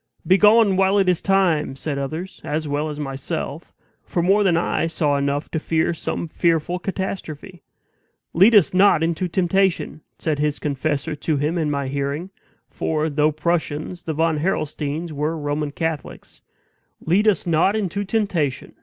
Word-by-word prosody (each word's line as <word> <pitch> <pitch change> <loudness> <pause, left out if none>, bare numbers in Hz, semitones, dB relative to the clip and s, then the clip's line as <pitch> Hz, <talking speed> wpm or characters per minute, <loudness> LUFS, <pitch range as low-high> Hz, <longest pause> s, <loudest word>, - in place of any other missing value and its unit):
"Begone, 210 +1 +5
while 195 +1 +3
it 195 -2 +3
is 180 -2 +2
time!" 180 -8 +1
said 140 +1 -4
others, 160 +7 -5
as 155 +1 -2
well 145 +2 -1
as 150 0 -6
myself; 145 +2 -5 0.3
for 170 - -2
more 195 +4 +4
than 175 -4 +3
I 165 -1 0
saw 155 -3 0
enough 140 +1 -1
to 160 - -1
fear 160 +2 0
some 165 - -4
fearful 170 +2 0
catastrophe. 185 -2 -5 0.7
"Lead 200 +7 +6
us 195 -4 +5
not 185 -3 +5
into 170 +2 0
temptation!" 185 -2 0 0.2
said 155 -3 -2
his 150 0 0
confessor 145 +1 -2
to 155 0 -1
him 150 +4 -1
in 160 -3 0
my 140 -2 -2
hearing 140 +6 -3 0.4
(for, 155 +3 -2
though 150 +1 +2
Prussians, 160 +1 -2
the 160 - -4
Von 160 0 +1
Harrelsteins 155 -1 -2
were 150 +2 -2
Roman 145 0 -2
Catholics), 160 0 -5 0.6
"lead 195 +7 +2
us 210 - +2
not 170 +4 +2
into 200 -1 -2
temptation! 190 - -1
160 Hz, 155 wpm, -22 LUFS, 150-185 Hz, 0.7 s, Lead